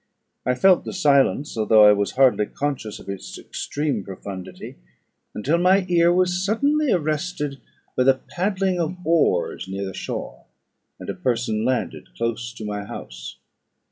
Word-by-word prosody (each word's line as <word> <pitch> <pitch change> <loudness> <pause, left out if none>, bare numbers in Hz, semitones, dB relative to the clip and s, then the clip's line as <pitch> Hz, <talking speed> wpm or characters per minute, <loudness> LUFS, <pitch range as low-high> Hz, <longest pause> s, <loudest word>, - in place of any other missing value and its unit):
I 125 - +2
felt 185 +7 +4
the - - -6
silence, 145 -4 +2
although 110 -1 +5
I 105 - +9
was 100 -1 -1
hardly 125 -5 +4
conscious 135 -7 -3
of - - -14
its 100 -1 -6
extreme 145 -8 -3
profundity, 95 -5 -8 0.6
until 150 +11 +1
my 185 +2 +4
ear 170 -1 +4
was 180 0 +1
suddenly 280 +7 +1
arrested 155 -3 -1 0.4
by 125 - +2
the 135 0 +6
paddling 185 +4 -1
of 170 +2 -2
oars 155 - +1
near 100 +1 -4
the 95 - -6
shore, - - -6 0.5
and - - -9
a - - -2
person 115 -3 -1
landed 105 - -2
close 115 0 -2
to 110 -2 -8
my 105 -1 -4
house. 60 - -9
135 Hz, 150 wpm, -23 LUFS, 105-175 Hz, 0.6 s, I